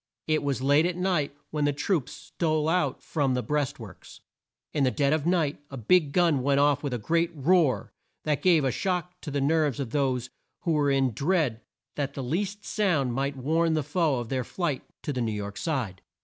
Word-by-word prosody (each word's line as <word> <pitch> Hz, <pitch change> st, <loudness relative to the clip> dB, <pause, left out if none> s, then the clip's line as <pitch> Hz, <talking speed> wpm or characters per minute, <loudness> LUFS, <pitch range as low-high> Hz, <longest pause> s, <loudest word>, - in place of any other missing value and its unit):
It 155 Hz, -1 st, +1 dB
was 140 Hz, -2 st, -2 dB
late 145 Hz, +4 st, +4 dB
at 180 Hz, -, -2 dB
night 175 Hz, -7 st, 0 dB, 0.2 s
when 150 Hz, -1 st, 0 dB
the 145 Hz, -, +3 dB
troops 150 Hz, -1 st, -1 dB
stole 155 Hz, -2 st, -1 dB
out 180 Hz, +2 st, 0 dB
from 140 Hz, -5 st, 0 dB
the 125 Hz, -, -1 dB
breast 145 Hz, -3 st, -1 dB
works. 100 Hz, -6 st, -12 dB, 0.5 s
In 145 Hz, -, +1 dB
the 130 Hz, -, +4 dB
dead 140 Hz, +2 st, +1 dB
of 155 Hz, 0 st, 0 dB
night 165 Hz, -5 st, +1 dB
a 135 Hz, -, -7 dB
big 145 Hz, -, +3 dB
gun 165 Hz, -5 st, +3 dB
went 140 Hz, +1 st, +2 dB
off 145 Hz, 0 st, +3 dB
with 145 Hz, -, -3 dB
a 125 Hz, -, -1 dB
great 165 Hz, +9 st, +1 dB
roar, 150 Hz, -, +2 dB, 0.3 s
that 150 Hz, -2 st, 0 dB
gave 165 Hz, -5 st, +4 dB
a 130 Hz, -, +2 dB
shock 180 Hz, -, -2 dB
to 155 Hz, -, -6 dB
the 145 Hz, 0 st, -1 dB
nerves 145 Hz, -1 st, +1 dB
of 130 Hz, -5 st, -3 dB
those 130 Hz, -3 st, 0 dB, 0.3 s
who 170 Hz, -, 0 dB
were 150 Hz, -2 st, +2 dB
in 135 Hz, -2 st, +2 dB
dread 140 Hz, -, 0 dB, 0.4 s
that 140 Hz, -1 st, -2 dB
the 135 Hz, -, -4 dB
least 195 Hz, +9 st, -2 dB
sound 155 Hz, -, +1 dB
might 135 Hz, +2 st, -2 dB
warn 160 Hz, +5 st, +1 dB
the 155 Hz, -, 0 dB
foe 160 Hz, -3 st, +1 dB
of 120 Hz, -2 st, -4 dB
their 130 Hz, -1 st, -1 dB
flight 150 Hz, 0 st, -2 dB, 0.2 s
to 145 Hz, -, -2 dB
the 125 Hz, -, -2 dB
New 115 Hz, -2 st, -1 dB
York 100 Hz, -1 st, -5 dB
side. 125 Hz, -, -3 dB
145 Hz, 210 wpm, -27 LUFS, 130-165 Hz, 0.5 s, late